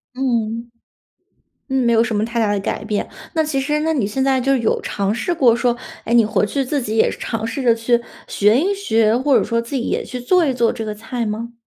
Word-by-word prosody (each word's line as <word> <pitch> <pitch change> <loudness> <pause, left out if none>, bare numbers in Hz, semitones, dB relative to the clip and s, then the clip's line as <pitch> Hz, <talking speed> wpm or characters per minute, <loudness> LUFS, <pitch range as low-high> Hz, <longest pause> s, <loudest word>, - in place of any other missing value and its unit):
嗯， 235 -3 -1 1.0
嗯， 265 -2 +1
没 235 - +3
有 225 0 +4
什 235 -1 -2
么 210 +1 +1
太 235 +1 -3
大 215 -3 +2
的 205 - 0
改 195 - -3
变。 210 -1 -2 0.3
那 320 - +3
其 295 -3 -1
实 300 +2 0
那 320 +1 0
你 260 -10 0
现 215 +6 -2
在 265 -1 +2
就 275 +2 +2
有 230 -3 0
尝 200 0 -1
试 345 +9 -1
过 255 -8 +4
说， 240 0 +1 0.3
哎， 230 - -3
你 235 -1 +6
回 210 0 +1
去 275 +5 -1
自 285 +2 -1
己 220 -3 -3
也 - - +4
是 - - -8
尝 225 -1 -3
试 230 +4 -4
着 235 -2 +4
去 235 +1 +1 0.3
学 210 +2 +3
一 380 +5 +1
学， 225 - +2
或 265 +2 +3
者 - - +4
说 230 -1 0
自 235 +4 -7
己 260 - 0
也 - - -2
去 250 - -6
做 345 +7 +3
一 265 - 0
做 235 -2 +2
这 225 - -5
个 215 -1 -4
菜 225 +2 -4
吗？ 225 +3 -4
235 Hz, 275 characters per minute, -19 LUFS, 225-265 Hz, 1.0 s, 你